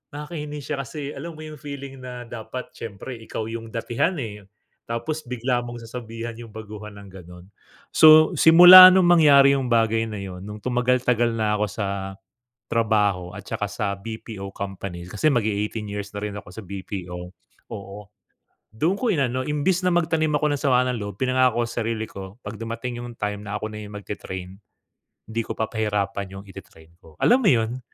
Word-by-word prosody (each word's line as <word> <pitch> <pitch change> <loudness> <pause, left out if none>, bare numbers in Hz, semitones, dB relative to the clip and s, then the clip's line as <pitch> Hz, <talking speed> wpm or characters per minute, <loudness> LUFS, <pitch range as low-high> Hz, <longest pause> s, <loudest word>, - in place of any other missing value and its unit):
nakakainis 150 -1 -6
siya, 150 - -2
kasi 145 +2 -6
alam 165 +4 -7
mo 155 - -11
yung 155 -1 -9
feeling 140 -2 -8
na 125 -1 -7
dapat 120 +2 -7
siyempre 115 +4 -7
ikaw 110 0 -5
yung 115 0 -6
datihan, 120 +10 -1
eh. 105 -3 -7 0.4
Tapos 150 +7 -4
bigla 125 0 -1
mong 120 0 -8
sasabihan 115 0 -7
yung 115 -2 -10
baguhan 105 -1 -9
ng 100 - -12
gano'n. 90 -1 -12 0.5
So, 155 0 +8
simula 180 +3 +11
nung 185 -2 +4
mangyari 140 -5 +6
yung 130 - -3
bagay 115 -1 +2
na 105 - -6
yun, 95 -2 -7
nung 105 +1 -8
tumagal-tagal 125 -1 +1
na 105 -1 +1
ako 105 - +2
sa 100 0 -3 0.8
trabaho 105 -5 +1
at - - -9
tsaka - - -3
sa 100 -1 -2
BPO 105 -1 -7
company. 95 -3 -6
Kasi 105 +10 +1
mag-e-eighteen 105 -2 -1
years 105 0 -5
na 105 - -5
rin 105 -1 -4
ako 100 - -9
sa 110 - -8
BPO, 90 -2 -7 0.4
oo. 100 -2 -8 0.7
Doon 155 - 0
ko 250 - -1
inano. 130 -5 0
Imbes 170 +5 0
na 180 - +2
magtanim 160 -2 +1
ako 150 0 +1
ng - - -7
sama 125 -3 +3
ng 125 - -1
loob, 100 -2 -6
pinangako 130 -2 +2
sa 115 - -4
sarili 110 -1 -2
ko, 95 +3 -10
'pag 100 +2 -7
dumating 115 +2 -5
yung 120 - -7
time 105 0 -3
na 105 0 -4
ako 110 - -4
na 105 0 -7
yung 105 0 -10
magte-train, 95 -2 -7 0.7
di 115 +1 -3
ko - - -4
papahirapan 105 -3 -2
yung 95 +1 -9
ite-train 85 -4 -14
ko, 80 -3 -18
alam 245 - +5
mo 205 - +4
yun? 115 -2 +1
115 Hz, 180 wpm, -23 LUFS, 100-135 Hz, 0.8 s, simula